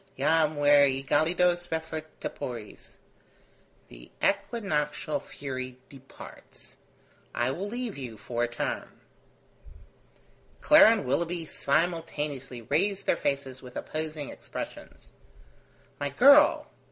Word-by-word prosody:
'Jam 160 -1 +2
ver 145 -1 +5
egelidos 170 +6 +1
refert 160 -1 -4
tepores.' 120 -6 -7 0.9
The - - -14
equinoctial 180 -8 -1
fury 130 -2 -7
departs. 135 -1 -14 0.6
I 120 +2 +1
will 190 +8 -4
leave 240 - -5
you 120 -5 -7
for 120 +3 -3
a - - +1
term." 120 0 -5 1.6
Clara 300 -6 +8
and 225 -9 +1
Willoughby 170 +5 -1
simultaneously 150 -5 -2
raised 195 - 0
their - - +3
faces 135 -2 -3
with 125 -1 -12
opposing 155 -2 -4
expressions. - - -9 0.9
"My 145 -1 -1
girl!" 280 - +6
150 Hz, 100 wpm, -28 LUFS, 130-175 Hz, 1.6 s, Clara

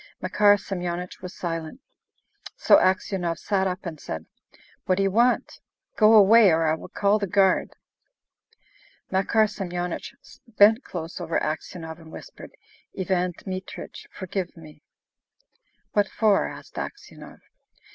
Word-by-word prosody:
Makar 205 -1 +4
Semyonich 180 -2 -5
was 180 -1 -8
silent. 165 - -5 0.8
So - - +6
Aksionov 185 -2 0
sat 195 -2 0
up 185 0 -5
and 160 -3 -6
said, 80 - -6 0.6
"What 185 - +2
do 195 - 0
you 195 - +1
want? 240 +5 +1 0.4
Go 215 0 +6
away, 215 +1 +7
or 165 -1 +2
I 155 - +2
will 160 - -7
call 205 +1 +1
the 200 - -2
guard!" 190 0 +2 1.4
Makar 195 +4 +2
Semyonich 180 -4 -5 0.3
bent 220 +2 +5
close 170 0 -7
over 165 -1 -1
Aksionov, 160 +1 -5
and 160 -1 -14
whispered, - - -11 0.5
"Ivan 180 -1 0
Dmitrich, 185 0 -8
forgive 185 -2 -5
me!" 155 -2 -14 1.1
"What 205 -1 +2
for?" 210 -3 +2
asked - - -10
Aksionov. 410 - -9
185 Hz, 125 wpm, -25 LUFS, 170-205 Hz, 1.4 s, away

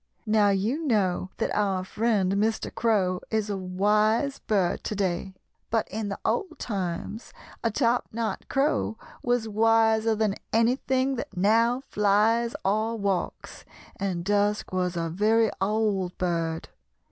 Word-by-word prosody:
Now, 215 -2 +4
you 215 +11 0
know 190 -6 +1
that - - -1
our 195 -3 +1
friend 205 -1 +1
Mr. 215 +2 0
Crow 190 -6 +1
is 215 -1 -1
a - - -1
wise 210 +8 +1
bird 195 -5 0
to 215 - -2
day, 190 -1 -2 0.3
but 225 -1 0
in 215 +1 -3
the 195 - -4
old 380 -8 -1
times 195 +1 -4 0.3
a 230 - +2
top 240 +1 +1
knot 220 -3 -3
crow 270 -5 +1 0.2
was 245 -2 0
wiser 220 +1 +3
than 210 -2 0
anything 255 +3 +1
that 200 - -6
now 230 +6 +3
flies 215 +3 +2
or 215 +3 +1
walks, 200 -3 -3 0.3
and 185 -3 -3
Dusk 205 +1 +1
was 180 -1 -1
a 165 0 -1
very 215 +6 +2
old 200 -3 0
bird. 165 -2 -2
210 Hz, 135 wpm, -26 LUFS, 190-225 Hz, 0.3 s, Now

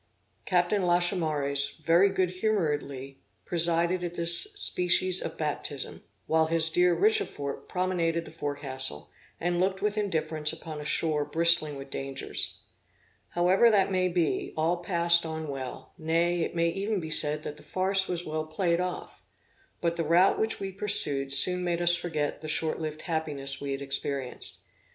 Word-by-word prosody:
Captain 180 +2 +2
Lachaumareys 160 -6 0
very 170 +5 +3
good 185 -2 0
humoredly 145 -10 -2 0.3
presided 170 +1 +1
at 175 0 -4
this 170 - +1
species 185 - +3
of - - -5
baptism, 150 -2 -4 0.2
while 160 0 +2
his 160 0 +2
dear 175 +1 +3
Richefort 410 - 0
promenaded 170 -3 -1
the - - -11
forecastle, 140 - -5 0.3
and 175 +1 -1
looked 190 +1 0
with 210 0 0
indifference 155 -6 0
upon 160 -2 -8
a - - -8
shore 150 0 +1
bristling 160 0 +3
with 135 0 -10
dangers. 135 0 -2 0.7
However 185 +6 +4
that 200 -3 +3
may 185 -1 +1
be, 175 -3 -1
all 165 +3 +1
passed 170 -1 +3
on 160 -1 -5
well; 135 -3 -7
nay, 170 +2 +1
it 165 - -3
may 170 0 +2
even 200 +4 -2
be 160 -2 -5
said 150 0 +4
that 150 - -6
the - - -13
farce 190 +5 0
was 175 -1 -3
well 155 0 -3
played 170 +2 0
off. 180 -1 -6 0.6
But 170 0 -1
the 165 - 0
route 170 +4 +3
which 220 0 -1
we 195 -1 -4
pursued 150 -9 -1
soon 180 +6 +3
made 175 -1 -1
us 175 0 +4
forget 155 -5 -3
the 155 - -7
short 155 +1 -1
lived 155 -1 -5
happiness 150 -5 0
we 140 -1 -4
had 135 0 -4
experienced. 135 -1 -2
165 Hz, 160 wpm, -28 LUFS, 150-180 Hz, 0.7 s, However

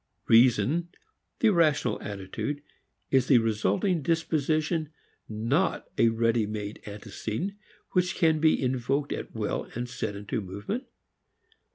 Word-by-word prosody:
Reason, 130 +8 +4 0.5
the 225 - +5
rational 160 -6 +2
attitude, 100 +9 -4 0.5
is 130 -2 +3
the 130 - +6
resulting 115 - +1
disposition, 155 0 0 0.4
not 115 - 0
a 115 - +4
ready 115 -1 +1
made 105 0 -5
antecedent 110 - -4 0.4
which 180 0 +1
can 160 -3 +3
be 160 0 +4
invoked 130 +2 0
at - - -6
will 110 -2 -2
and 120 +1 -3
set 105 -3 -4
into 105 +4 -3
movement. 100 - -5
125 Hz, 115 wpm, -28 LUFS, 110-160 Hz, 0.5 s, the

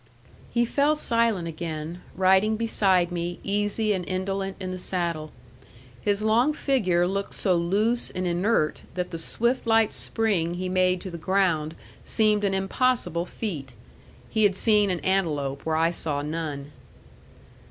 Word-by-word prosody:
He 240 0 +1
fell 285 +5 +2
silent 230 - +1
again, 165 +1 -5
riding 190 +3 +3
beside 190 -6 +2
me, 175 0 -3
easy 205 +1 0
and 185 -2 -2
indolent 195 +1 -2
in 185 0 -4
the 185 - -5
saddle. 170 -4 -2 0.7
His 205 0 0
long 235 +7 +3
figure 190 - +1
looked 195 +2 -3
so 185 -3 +2
loose 205 +8 +1
and 185 0 -4
inert 175 -2 +1
that 180 -1 -3
the 165 - -5
swift, 235 +9 -1
light 225 -1 +3
spring 190 -7 0
he 185 +1 -3
made 185 -1 +2
to 190 - -6
the 170 - -7
ground 165 -4 +1 0.3
seemed 215 -2 +2
an 195 -1 +1
impossible 190 -3 0
feat. 145 - -5 0.5
He 220 - -1
had 205 -3 +4
seen 210 0 +3
an 180 -2 -1
antelope 150 -8 -1
where 160 - +1
I 165 +1 +3
saw 145 -4 -2
none. 150 -2 -4
185 Hz, 150 wpm, -25 LUFS, 170-215 Hz, 0.7 s, had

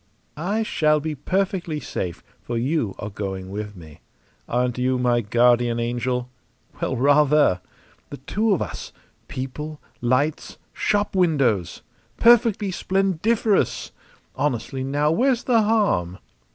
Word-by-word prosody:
"I 200 +9 -1
shall 155 -7 +2
be 155 +1 -3
perfectly 175 +1 -1
safe, 90 - -5 0.2
for 120 - -4
you 125 -4 -1
are 105 - -6
going 95 -2 -5
with 105 0 -5
me. 80 -4 -13 0.5
Aren't 125 0 0
you 130 +1 +1
my 120 -1 +2
guardian 120 +2 +3
angel? 120 +1 -1 0.5
Well, 130 - -1
rather! 145 -6 +4 0.5
The 145 - -7
two 210 - -1
of 190 - +2
us - - -7 0.4
people, 150 +4 -6 0.2
lights, 130 +6 0 0.2
shop 205 -1 0
windows! 140 - +1 0.3
Perfectly 230 -4 +4
splendiferous! 195 +3 0 0.4
Honestly, 130 -1 -2
now, 145 +3 +1
where's 245 +6 +2
the 235 -3 +3
harm?" 200 - +1
145 Hz, 120 wpm, -23 LUFS, 120-190 Hz, 0.5 s, rather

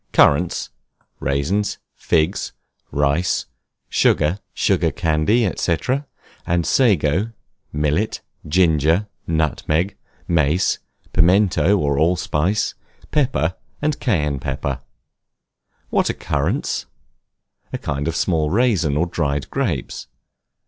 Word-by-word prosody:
CURRANTS, 80 +5 +3 0.5
RAISINS, 70 +10 0 0.2
FIGS, 80 +4 0 0.4
RICE, 75 +5 +1 0.5
SUGAR, 80 +6 +2 0.2
SUGAR - - +2
CANDY, 80 +9 +2
&C., 85 -2 +1 0.9
SAGO, 95 - +2 0.4
MILLET, 75 +8 0 0.3
GINGER, 80 +3 +3 0.2
NUTMEG, 80 +3 0 0.3
MACE, 80 +2 +2 0.3
PIMENTO 95 +3 +4
OR 70 -5 0
ALLSPICE, 90 +3 +1 0.4
PEPPER, 130 - +1 0.3
AND 150 -1 -1
CAYENNE 75 - 0
PEPPER. 70 0 -3 1.1
What - - +2
are - - +1
Currants? - - -1 0.8
A - - -2
kind 75 +1 -3
of 80 - -1
small 80 -3 +1
raisins 95 - +2
or 85 - +2
dried 75 -5 -2
grapes. - - -2
80 Hz, 90 wpm, -21 LUFS, 75-95 Hz, 1.1 s, PIMENTO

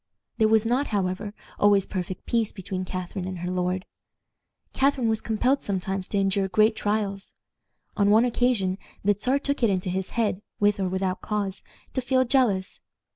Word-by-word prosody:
There 220 - +5
was 220 0 +3
not, 250 +5 +1
however, 200 0 -1 0.3
always 205 -2 +4
perfect 185 0 -5
peace 230 -3 0
between 185 -1 -5
Catharine 185 0 -4
and 185 -1 -5
her 175 +1 -3
lord. 185 0 -1 0.9
Catharine 270 -3 +2
was 220 -1 +1
compelled 250 +5 +1
sometimes 190 -1 -3
to 205 - -2
endure 195 0 +1
great 215 +4 +3
trials. 205 -2 -2 0.6
On 200 -1 +3
one 220 +3 +6
occasion 230 -6 +1 0.2
the 205 +1 +4
Czar 255 +7 +1
took 280 0 -2
it 230 - +4
into 185 -2 0
his 190 0 -2
head, 210 -4 +1 0.2
with 205 0 +3
or 190 -1 0
without 185 0 -1
cause, 205 -2 -2 0.3
to 260 - 0
feel 255 +1 +2
jealous. 235 -8 +1
200 Hz, 170 wpm, -26 LUFS, 190-225 Hz, 0.9 s, one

